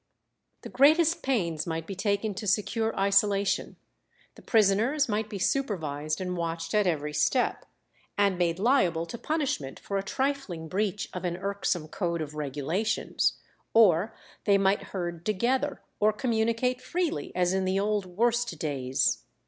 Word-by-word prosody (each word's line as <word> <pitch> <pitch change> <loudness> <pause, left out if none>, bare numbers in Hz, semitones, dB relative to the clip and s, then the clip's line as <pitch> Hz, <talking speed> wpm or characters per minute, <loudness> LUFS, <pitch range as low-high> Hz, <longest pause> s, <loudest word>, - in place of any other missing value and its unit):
The - - -7
greatest 310 +5 +4
pains 175 - -1
might 165 -1 -3
be 195 - -6
taken 200 +2 -1
to 210 +2 -6
secure 220 +2 0
isolation, 200 0 +2 0.6
the - - -15
prisoners 225 +7 +3
might 215 -1 -1
be 210 - -5
supervised 160 - -1
and 180 -1 -3
watched 165 -1 -3
at 210 -2 +3
every 150 -3 -1
step, 195 - +1 0.5
and 200 -2 +3
made 170 -2 0
liable 185 -7 +2
to 235 - -7
punishment 280 - -2
for 200 -1 -3
a - - -4
trifling 260 - -2
breach 200 +2 -1
of 180 - -5
an 175 -1 -2
irksome 190 -4 -2
code 170 -1 -2
of 150 -1 -8
regulations, 150 +9 -1 0.4
or 205 -3 +5 0.3
they 200 -2 +5
might 195 0 +2
herd 175 -3 -4
together 255 +8 0 0.2
or 215 +1 +4
communicate 230 +2 0
freely 340 - -2
as 180 0 +2
in 190 0 +1
the 185 +1 +1
old 205 -1 0
worst 235 +1 0
days. 135 -4 0
195 Hz, 150 wpm, -28 LUFS, 170-225 Hz, 0.6 s, or